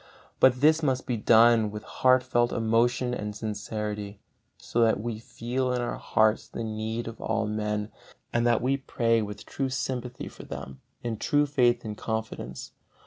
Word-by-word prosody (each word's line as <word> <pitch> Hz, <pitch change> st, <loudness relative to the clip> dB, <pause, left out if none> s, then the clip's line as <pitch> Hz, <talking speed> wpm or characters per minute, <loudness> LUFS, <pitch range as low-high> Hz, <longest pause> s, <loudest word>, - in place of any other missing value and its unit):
But 130 Hz, -1 st, +5 dB
this 155 Hz, +2 st, +5 dB
must 130 Hz, -4 st, 0 dB
be 125 Hz, -, -1 dB
done 115 Hz, 0 st, +5 dB
with 105 Hz, 0 st, -7 dB
heart 130 Hz, 0 st, +3 dB
felt 120 Hz, -1 st, +1 dB
emotion 120 Hz, +2 st, +1 dB
and 105 Hz, -3 st, -4 dB
sincerity, 105 Hz, -1 st, -4 dB, 0.4 s
so 120 Hz, -, -1 dB
that 110 Hz, -3 st, +4 dB
we 110 Hz, 0 st, -4 dB
feel 125 Hz, +3 st, -2 dB
in 125 Hz, -, 0 dB
our 120 Hz, -, -3 dB
hearts 110 Hz, 0 st, +2 dB
the 115 Hz, -, -5 dB
need 110 Hz, +1 st, -3 dB
of 115 Hz, -1 st, -8 dB
all 110 Hz, -, 0 dB
men, 105 Hz, 0 st, -2 dB, 0.4 s
and 120 Hz, -, +2 dB
that 120 Hz, -1 st, +2 dB
we 135 Hz, +2 st, +2 dB
pray 115 Hz, -4 st, +1 dB
with 105 Hz, -1 st, -6 dB
true 135 Hz, -1 st, -2 dB
sympathy 125 Hz, -2 st, -3 dB
for -, -, -11 dB
them, 65 Hz, 0 st, -8 dB, 0.2 s
in 115 Hz, -2 st, -2 dB
true 145 Hz, +6 st, +2 dB
faith 120 Hz, -4 st, +2 dB
and 105 Hz, -1 st, -5 dB
confidence. 110 Hz, -, -5 dB
115 Hz, 170 wpm, -27 LUFS, 110-125 Hz, 0.4 s, But